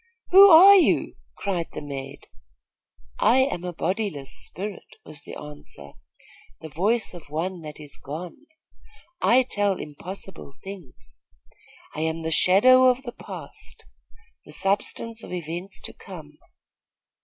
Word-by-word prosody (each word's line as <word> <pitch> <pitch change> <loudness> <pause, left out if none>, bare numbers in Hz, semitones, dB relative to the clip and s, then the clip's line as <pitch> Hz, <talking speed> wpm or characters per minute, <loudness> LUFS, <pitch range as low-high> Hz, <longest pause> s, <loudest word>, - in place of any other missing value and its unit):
'Who 395 +2 +10
are 385 +4 +9
you?' 360 - +2 0.2
cried 180 -5 -2
the - - -6
maid. 135 -1 -8 0.9
'I 240 - +4
am 260 -10 -1
a 180 - -4
bodiless 180 -7 -3
spirit,' 200 +1 -6
was 155 -2 -11
the - - -10
answer, 145 - -11 0.7
'the 160 - -9
voice 200 - 0
of 170 -5 -12
one 170 +4 -3
that 150 -1 -10
is 145 -2 -10
gone. 170 - -8 0.7
I 255 +2 +4
tell 205 -5 -1
impossible 180 +1 -9
things. 190 -8 -11 0.8
I - - -6
am 160 +1 -2
the 160 - -3
shadow 255 +11 +5
of 255 +1 +2
the 240 - -6
past, - - -11 0.6
the - - -13
substance 220 +3 -2
of - - -10
events 175 +3 -5
to - - -8
come. 155 -6 -12
180 Hz, 130 wpm, -24 LUFS, 155-220 Hz, 0.9 s, Who